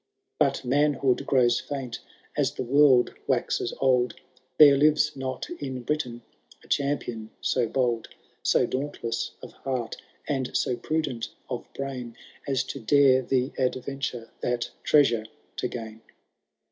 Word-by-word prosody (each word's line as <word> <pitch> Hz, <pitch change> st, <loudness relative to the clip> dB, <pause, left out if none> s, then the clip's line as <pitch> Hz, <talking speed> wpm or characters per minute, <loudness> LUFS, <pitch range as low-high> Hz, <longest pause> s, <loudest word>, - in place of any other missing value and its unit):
But -, -, +2 dB
manhood 140 Hz, -1 st, +2 dB
grows 120 Hz, -3 st, +4 dB
famt 135 Hz, -4 st, -5 dB, 0.4 s
as -, -, +1 dB
the -, -, -2 dB
world 130 Hz, -1 st, +5 dB
waxes 120 Hz, -, 0 dB
old; 125 Hz, -3 st, +2 dB, 0.4 s
There 145 Hz, -2 st, +9 dB
lives 150 Hz, +1 st, +3 dB
not 130 Hz, -1 st, -4 dB
in 130 Hz, -3 st, -5 dB
Britain 120 Hz, -4 st, -2 dB, 0.4 s
a -, -, -18 dB
champion 130 Hz, -6 st, -1 dB
so 125 Hz, -3 st, +1 dB
bold. 120 Hz, -2 st, 0 dB, 0.3 s
So -, -, +3 dB
dauntless 130 Hz, -4 st, -3 dB
of -, -, -8 dB
heart, 130 Hz, -4 st, -4 dB, 0.3 s
and 135 Hz, -4 st, -1 dB
so 125 Hz, -, 0 dB
prudent 150 Hz, -5 st, -2 dB, 0.2 s
of -, -, -4 dB
brain. 125 Hz, -4 st, -5 dB, 0.3 s
As 135 Hz, -3 st, +1 dB
to 140 Hz, -, -7 dB
dare 130 Hz, +2 st, +5 dB
the 130 Hz, +1 st, 0 dB
adventure 130 Hz, -2 st, -2 dB
that 120 Hz, -1 st, -1 dB
treasure 120 Hz, -7 st, +4 dB, 0.3 s
to -, -, 0 dB
gain. 110 Hz, -2 st, -7 dB
130 Hz, 130 wpm, -26 LUFS, 120-140 Hz, 0.4 s, There